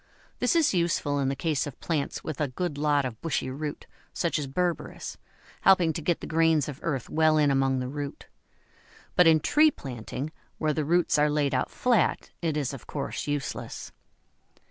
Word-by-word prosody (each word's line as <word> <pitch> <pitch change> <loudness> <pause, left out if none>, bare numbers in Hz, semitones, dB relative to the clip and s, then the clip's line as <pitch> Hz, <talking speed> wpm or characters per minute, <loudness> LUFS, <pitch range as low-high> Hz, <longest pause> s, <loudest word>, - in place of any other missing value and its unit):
This 250 - +2
is 320 -7 +4
useful 170 -5 +1
in 135 -1 +1
the 135 - -1
case 150 -1 0
of 140 - -9
plants 155 -4 -2
with 155 -1 -4
a 150 - +2
good 150 +4 -3
lot 145 -2 +2
of 120 -3 -6
bushy 160 -5 -1
root, 145 +2 -5 0.3
such 170 -2 0
as 145 - -3
Berberis, 175 +5 -2 0.4
helping 180 -4 +5
to 165 - -4
get 170 +2 0
the - - -5
grains 160 -2 +3
of 145 -2 -6
earth 140 -8 -2
well 155 0 +3
in 145 -2 +4
among 135 -1 +2
the 125 0 -2
root; 145 +1 -6 0.9
but 180 - +6
in 160 -1 +6
tree 305 - +5
planting, 130 - -6 0.3
where 155 -1 +1
the 150 0 -1
roots 170 -1 +3
are 150 0 +4
laid 145 -2 +1
out 130 - 0
flat, 240 -7 +1
it 160 -3 0
is 140 -2 -1
of 135 - -9
course 145 - -4
useless. 145 -1 -4
150 Hz, 190 wpm, -27 LUFS, 140-165 Hz, 0.9 s, but